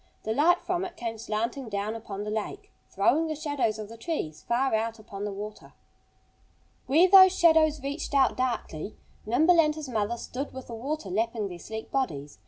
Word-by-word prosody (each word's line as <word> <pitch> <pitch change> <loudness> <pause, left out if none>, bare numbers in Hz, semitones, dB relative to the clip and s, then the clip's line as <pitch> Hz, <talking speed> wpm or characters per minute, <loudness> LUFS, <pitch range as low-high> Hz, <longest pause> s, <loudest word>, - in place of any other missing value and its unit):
The 220 - -1
light 340 +8 +4
from 360 0 -1
it 360 -2 -7
came 225 -2 -4
slanting 230 +3 -3
down 205 +1 -2
upon 210 -3 -6
the 210 - -4
lake, 215 -1 -5 0.2
throwing 275 +12 +2
the 310 - -3
shadows 290 -8 -1
of 215 -1 -6
the 230 +2 -11
trees 225 - -4
far 255 +2 0
out 225 +1 0
upon 205 -2 -7
the 205 - -3
water. 210 +2 -8 1.1
Where 320 +8 +5
those 375 0 +8
shadows 315 -3 +4
reached 285 +1 -4
out 270 -2 +4
darkly 235 -8 -3 0.3
Nimble 320 +9 +5
and 305 -1 +1
his 310 -2 -6
mother 225 0 -1
stood 270 +4 -6
with 260 -1 -8
the 235 - -9
water 245 -2 -4
lapping 220 0 -1
their 175 -1 -8
sleek 220 +4 -7
bodies. 150 - -3
235 Hz, 190 wpm, -27 LUFS, 215-305 Hz, 1.1 s, those